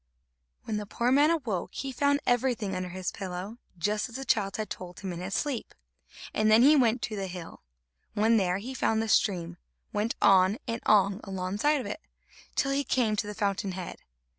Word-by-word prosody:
When 215 -2 -3
the 210 -1 -5
poor 235 +4 0
man 290 +3 +5
awoke, 255 - -2
he 270 - -3
found 285 +2 +2
everything 245 -5 +1
under 185 0 -3
his 185 +1 -4
pillow, 190 +4 -6 0.2
just 210 +7 -1
as 235 - -12
the 270 +1 -5
child 195 -5 +1
had 215 -1 -3
told 180 -1 -7
him 190 -3 -4
in 170 - -6
his 190 +2 -4
sleep; 275 -3 -2 0.6
and 215 0 +2
then 220 +2 +7
he 295 +3 +7
went 240 -3 +3
to 215 - -3
the 195 -2 -3
hill. 175 -2 -8 0.5
When 220 +2 +4
there, 185 -3 +1
he 240 +7 -6
found 225 -3 +1
the - - -3
stream, 175 -5 +1 0.4
went 210 +3 0
on 190 +1 +5
and 230 0 -3
on 200 0 +4
alongside 195 +10 0
of 255 - -5
it, 210 +10 -5 0.5
till 275 - +1
he 280 +1 +1
came 240 -5 +1
to 205 - -1
the 210 - -6
fountain 200 -2 -1
head. 185 -1 -6
210 Hz, 200 wpm, -28 LUFS, 190-245 Hz, 0.6 s, then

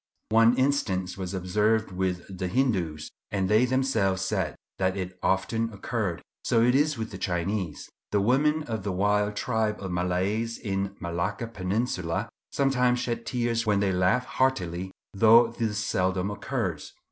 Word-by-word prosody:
One 115 +2 +5
instance 95 -10 0
was 95 0 -4
observed 105 +4 +1
with 90 -1 -2
the 90 0 -3
Hindoos, 90 - 0 0.2
and 95 -2 0
they 110 +5 +4
themselves 115 -8 +1
said - - -1 0.2
that 95 0 +1
it 90 -1 -5
often 115 +4 0
occurred. 100 -3 -3 0.2
So 115 - +3
it 125 +1 +4
is 145 +1 +2
with 110 0 -4
the 95 - -7
Chinese. 90 -1 -2 0.2
The 105 - +3
women 145 +8 +2
of 110 -7 -4
a - - 0
wild 105 +2 +1
tribe 110 -2 0
of 95 -2 -5
Malays 95 +6 -1
in 95 -1 -2
the 100 - -7
Malacca 85 +6 -2
peninsula, 100 -2 -2 0.2
sometimes 125 -3 +2
shed 120 -1 -3
tears 120 -2 0
when 105 -2 +3
they 100 -1 +2
laugh 95 +7 +2
heartily, 95 -11 0 0.2
though 115 +3 +6
this 110 -3 -2
seldom 95 -1 0
occurs. 105 - -3
105 Hz, 155 wpm, -27 LUFS, 95-115 Hz, 0.2 s, though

